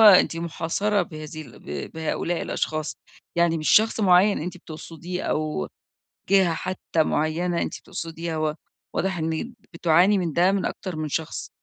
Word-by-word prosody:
أنتِ 200 -6 +8
محاصرة 170 +5 0
بهذه 155 0 -7
ال 120 -5 -14
ب 70 -1 -6
بهؤلاء 160 +2 -1
الأشخاص، 155 -1 -2 0.4
يعني 170 -1 +3
مش 155 - -1
شخص 220 +1 +5
معين 195 +1 +5
أنتِ 180 +3 -4
بتقصديه 165 +2 -7
أو 155 - -1 0.6
جهة 190 -4 +5
حتى 175 -2 -1
معينة 170 +4 0
أنتِ - - -3
بتقصديها، 165 0 -5
و 155 -1 0 0.4
واضح 190 -1 0
إن 160 +9 -2 0.2
بتُعاني 175 +4 +4
من 170 -5 -1
ده 180 +2 +4
من 195 -1 0
أكتر 185 -4 -4
من 155 0 -2
شخص. 160 +2 -3
170 Hz, 150 wpm, -25 LUFS, 155-185 Hz, 0.6 s, أنتِ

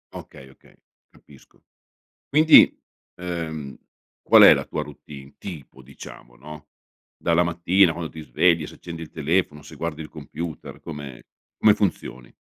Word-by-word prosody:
Okay, 65 - -12
okay, 65 - -23 0.3
capisco. - - -22 0.7
Quindi, 155 +2 +6 0.4
ehm, 80 -5 -6 0.5
qual - - +6
è - - +9
la - - -3
tua - - -4
routine 70 -1 -12
tipo, 75 -7 -10
diciamo, 60 -2 -14
no, 75 +3 -12 0.5
dalla 85 +1 +1
mattina 85 +1 +2
quando 85 -1 -6
ti 80 - -10
svegli, 80 0 +1
se - - -13
accendi 85 -1 -9
il 80 - -10
telefono, 80 -1 -1
se - - -13
guardi 80 -2 -5
il 75 - -10
computer, 80 +2 -8
come 70 -5 -9 0.4
come 105 -1 +5
funzioni? 85 - -4
80 Hz, 140 wpm, -23 LUFS, 70-85 Hz, 0.7 s, è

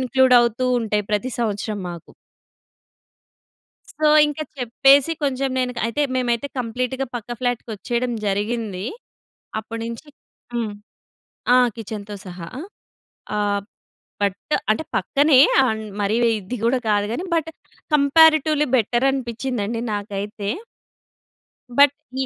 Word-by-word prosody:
ఇంక్లూడవుతూ 255 -2 +4
ఉంటాయి 210 -2 -1
ప్రతి 235 +5 0
సంవత్సరం 210 -2 -2
మాకు. 170 -1 -10 1.8
సో, 310 - -2 0.2
ఇంక 295 0 -5 0.2
చెప్పేసి 270 +5 +4
కొంచెం 270 -1 0
నేను 250 -1 0
క - - -4
అయితే, 230 +6 -1
మేమైతే 245 +1 0
కంప్లీట్‌గా 250 +3 -2
పక్క 235 -1 -6
ఫ్లాట్‌కొచ్చేయడం 245 0 -2
జరిగిందీ. 205 -1 -2 0.7
అప్పుడు 225 +1 -6
నించీ 235 +6 -7 0.5
హ్మ్. 230 -3 -1 0.8
ఆ! - - +7 0.2
కిచెన్‌తో 210 -2 -7
సహా. 175 -2 -8 0.9
ఆహ్, 205 -1 0 0.6
బట్టు 200 +9 0
అంటే 220 +9 +1
పక్కనే, 275 - +3 0.3
అండ్ 220 -2 -2 0.2
మరీ 205 +2 +1
వ్ - - +5
ఇది 205 +5 -6
గూడా 245 +3 +3
కాదు 205 0 +2
గానీ, 345 +10 -3
బట్ 325 -1 0 0.4
కంపేరిటివ్లీ 305 +1 +5
బెటరనిపిచ్చిందండి 240 -2 -1
నాకైతే. 205 0 -4 1.3
బట్ 285 -1 +7 0.3
ఈ - - -2
235 Hz, 110 wpm, -22 LUFS, 210-265 Hz, 1.8 s, ఆ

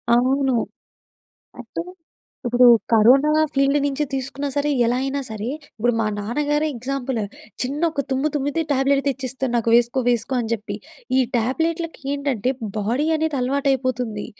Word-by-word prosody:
అవును. 260 +1 +2 1.1
అంటే 245 +7 -5 0.6
ఇప్పుడు 245 +1 +5 0.3
కరోనా 250 +7 +6 0.2
ఫీల్డ్ 275 +1 +3
నుంచి 285 +1 -1
తీసుకున్నా 270 +2 -3
సరే, 290 +1 +1 0.2
ఎలా 245 +2 +1
అయినా 270 +1 -1
సరే, 220 +1 -5 0.3
ఇప్పుడు 240 +3 +2
మా 220 - +1
నాన్నగారే 295 +8 0
ఎగ్జాంపుల్. 255 0 -3 0.4
చిన్న 275 +4 -3
ఒక 285 -3 -2
తుమ్ము 265 +3 +1
తుమ్మితే 290 +3 0
ట్యాబ్లెట్ 275 +1 +2
తెచ్చిస్తారు 265 -1 -3
నాకు 230 -1 +1
వేసుకో, 240 +2 +3
వేసుకో 240 +2 0
అని 225 -1 -4
చెప్పి. 225 -2 -3 0.4
ఈ - - +6 0.2
ట్యాబ్లెట్లకి 325 +8 -1
ఏంటంటే 265 -4 -1 0.3
బాడీ 235 +8 0
అనేది 315 -2 -1
అలవాటైపోతుంది. 255 -4 -1
265 Hz, 135 wpm, -22 LUFS, 240-280 Hz, 1.1 s, కరోనా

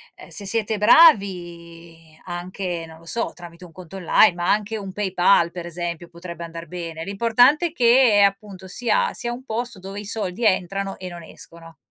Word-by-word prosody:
ehm, - - -14
se 200 - -9
siete 220 +1 -2
bravi 170 - +2
anche, 175 -1 -5
non 160 0 -13
lo 165 - -19
so, 230 +7 -2
tramite 175 0 -13
un 170 - -15
conto 180 +2 -12
online, 180 0 +4
ma 175 0 -1
anche 210 +1 -1
un 195 -2 -7
PayPal 190 -3 +2
per 175 -1 -7
esempio 175 0 -5
potrebbe 170 0 -9
andar 165 0 -8
bene. 165 -2 -6
L'importante 245 - +3
è - - -10
che 240 -5 +5
appunto 195 -1 -4
sia 220 +3 0
sia 240 -1 -4
un 255 +2 -10
posto 230 -3 -4
dove 195 +2 -8
i - - -10
soldi 210 0 -4
entrano 195 0 0
e 185 - -8
non 170 -1 -10
escono. 165 0 -13
185 Hz, 180 wpm, -22 LUFS, 170-210 Hz, -, che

